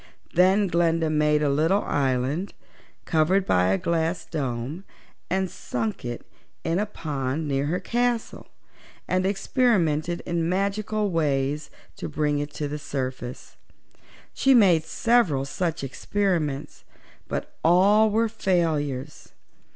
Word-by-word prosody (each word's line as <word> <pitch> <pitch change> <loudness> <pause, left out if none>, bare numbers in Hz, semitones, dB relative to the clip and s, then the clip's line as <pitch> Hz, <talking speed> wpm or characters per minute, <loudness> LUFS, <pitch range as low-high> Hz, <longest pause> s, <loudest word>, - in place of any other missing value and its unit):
Then 190 +4 +4
Glinda 165 -2 +1
made 150 0 +2
a 145 - +2
little 165 +8 +2
island, 135 +6 -1 0.5
covered 180 +4 +2
by 90 - +3
a 95 +1 +2
glass 165 - -1
dome, 135 +3 -4 0.5
and 190 0 +1
sunk 115 - -4
it 120 -1 -5 0.4
in 165 +3 0
a 210 - 0
pond 150 -5 -3
near 140 0 0
her 175 +4 0
castle, 240 +3 -1 0.6
and 185 +1 +1
experimented 175 - +1
in 170 -1 -1
magical 200 +2 -1
ways 150 -2 0 0.3
to - - -5
bring 150 -1 0
it 145 0 -4
to 150 - -2
the 150 +1 -5
surface. 130 -3 -5 0.8
She 270 -1 +4
made 180 -9 +5
several 165 - +2
such 165 +2 -2
experiments, 155 -1 -2 0.4
but - - -4
all 200 +6 +5
were 225 +2 +2
failures. 155 - -1
165 Hz, 120 wpm, -25 LUFS, 145-190 Hz, 0.8 s, made